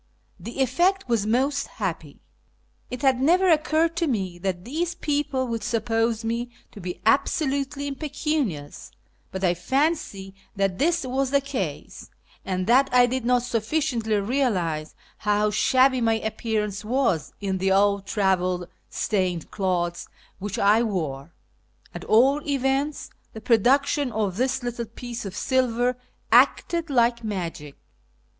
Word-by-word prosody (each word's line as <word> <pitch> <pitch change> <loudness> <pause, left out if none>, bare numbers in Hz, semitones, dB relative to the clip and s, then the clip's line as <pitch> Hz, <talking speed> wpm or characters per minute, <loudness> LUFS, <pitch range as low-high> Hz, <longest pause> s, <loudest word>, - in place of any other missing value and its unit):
The 235 +9 -5
effect 350 +9 +2
was 225 -4 0
most 275 +5 +1
happy. 165 -8 -5 0.7
It 250 +1 -6
had 260 -2 +3
never 355 +6 +4
occurred 315 +1 +2
to 335 - +1
me 190 -9 -2
that 180 -1 -3
these 335 +7 -2
people 290 -4 -1
would 230 -2 -3
suppose 225 0 0
me 235 +2 -2 0.2
to 205 - -11
1)6 180 0 -5
absolutely 280 +2 +1
impecunious, 280 - -3 0.4
but 190 0 -5
I 175 -2 +3
fancy 200 - -1 0.2
that 195 -2 0
this 335 0 +1
was 265 +1 -1
the 280 +1 +3
case, 275 0 -5 0.3
and 185 -1 -2
that 260 +5 +4
I 250 0 +6
did 250 0 -2
not 245 0 +3
sufficiently 235 -1 -1
realise 195 - -1 0.2
how 210 0 +1
shabby 255 +4 +3
my 225 -1 +3
appearance 220 -2 -2
was 235 - 0
in 190 -2 -2
the 190 +1 +1
old 200 0 +2
travel 185 -3 0 0.2
stained 185 -5 -1
clothes 175 -3 -1 0.3
which 205 +3 -4
I 210 +1 +4
wore. 160 -9 -3 0.6
At - - -7
all 270 +6 +4
events, 275 +1 -1 0.2
the 220 - -7
production 260 +5 +2
of 205 -4 -2
this 260 +1 0
little 240 -1 -3
piece 235 +1 -7
of 195 -1 -6
silver 250 -1 +1 0.4
acted 335 -1 +3
like 235 -3 +2
magic. 170 -8 -5
235 Hz, 135 wpm, -24 LUFS, 195-270 Hz, 0.7 s, I